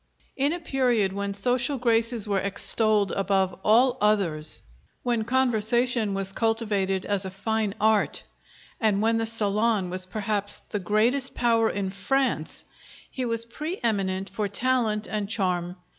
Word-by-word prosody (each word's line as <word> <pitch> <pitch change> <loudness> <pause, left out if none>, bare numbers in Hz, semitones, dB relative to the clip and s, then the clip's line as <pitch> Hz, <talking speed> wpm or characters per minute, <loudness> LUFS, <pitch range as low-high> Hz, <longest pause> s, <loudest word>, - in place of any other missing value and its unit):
In 280 +2 +1
a 350 - -3
period 245 - +1
when 200 0 -3
social 245 +6 +1
graces 230 -2 +1
were 200 -1 +1
extolled 205 +1 +2
above 195 -1 +1
all 245 +4 +4
others, 175 -8 +1 0.4
when 235 -3 0
conversation 240 -2 +1
was 195 0 -2
cultivated 205 -4 0
as 200 -1 -1
a 190 - -3
fine 210 +1 -2
art, 210 - +2 0.6
and 210 -2 +1
when 225 0 +2
the 225 - -1
salon 210 -3 0
was 185 0 -1
perhaps 205 +1 -1
the 210 - -5
greatest 230 +8 +1
power 230 -2 +2
in 195 -2 -3
France, 260 +8 -1 0.5
he 255 - -3
was 230 -1 -1
pre 305 - -5
eminent 195 -4 0
for 205 +1 -3
talent 230 -2 0
and 210 -2 -3
charm. 180 -4 -1
215 Hz, 145 wpm, -26 LUFS, 195-235 Hz, 0.6 s, all